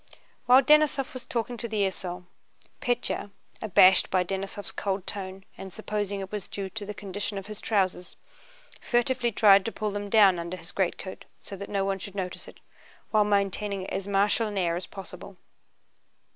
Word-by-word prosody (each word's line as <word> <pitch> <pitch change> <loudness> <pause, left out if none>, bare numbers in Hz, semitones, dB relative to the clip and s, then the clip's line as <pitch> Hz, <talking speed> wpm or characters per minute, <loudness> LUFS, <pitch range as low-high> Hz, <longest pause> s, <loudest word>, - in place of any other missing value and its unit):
While 255 +2 +7
Denísov 300 -2 +4
was 255 -2 -8
talking 240 0 -2
to 235 - -3
the 215 -2 0
esaul, 180 -1 -5 0.6
Pétya—abashed 200 -5 +2
by 185 -1 +2
Denísov's 195 +2 -4
cold 195 -1 -2
tone 190 -1 -6
and 190 - -7
supposing 205 -1 -3
that - - -3
it 190 - -21
was 210 -2 -4
due 195 -1 -5
to 210 -2 -6
the 210 - -5
condition 205 +1 -4
of 195 - -5
his 210 -1 -8
trousers—furtively 240 - -2
tried 200 -2 +6
to 225 - -2
pull 215 -1 -3
them 205 0 -4
down 200 -5 +6
under 170 +2 -5
his 165 -1 -8
greatcoat 190 0 -3
so 200 - -8
that 200 +1 -8
no 195 -1 0
one 195 0 -1
should 200 +1 -8
notice 185 -2 -5
it, - - -14 0.5
while 215 -1 +5
maintaining 200 -1 0
as 195 - -3
martial 205 +3 +2
an 205 -1 -5
air 170 -3 +1
as 175 - -5
possible. 195 0 -10
200 Hz, 170 wpm, -27 LUFS, 190-215 Hz, 0.6 s, While